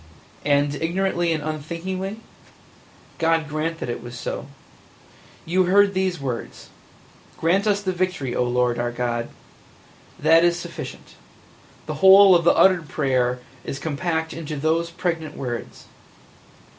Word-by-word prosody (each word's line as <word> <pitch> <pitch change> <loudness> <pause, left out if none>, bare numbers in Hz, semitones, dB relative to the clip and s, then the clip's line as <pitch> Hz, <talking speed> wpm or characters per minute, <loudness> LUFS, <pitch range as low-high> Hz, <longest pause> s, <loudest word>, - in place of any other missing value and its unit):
And 145 0 +2
ignorantly 175 +2 0
and 155 -2 -1
unthinkingly? 180 +7 -4 1.0
God 165 -1 +2
grant 155 +2 -2
that - - -5
it 120 - -4
was 120 0 -9
so! - - -5 1.0
You 185 +3 +2
heard 200 +2 +4
these 185 -2 -1
words: 130 -4 -6 0.7
'Grant 190 +6 +1
us 205 -1 +2
the 190 - 0
victory, 180 -8 -2
O - - +2
Lord 125 -1 0
our 120 0 -1
God!' 120 -1 -2 0.9
That 165 +2 +5
is 175 0 +3
sufficient. 175 - -8 0.7
The - - -4
whole 195 0 +9
of 170 -2 +3
the - - +5
uttered 180 -5 +4
prayer 125 -3 0 0.2
is 135 - -5
compact 160 +2 -2
into 160 -2 -6
those 160 +3 0
pregnant 165 -3 -3
words. 120 -3 -6
165 Hz, 130 wpm, -23 LUFS, 140-180 Hz, 1.0 s, whole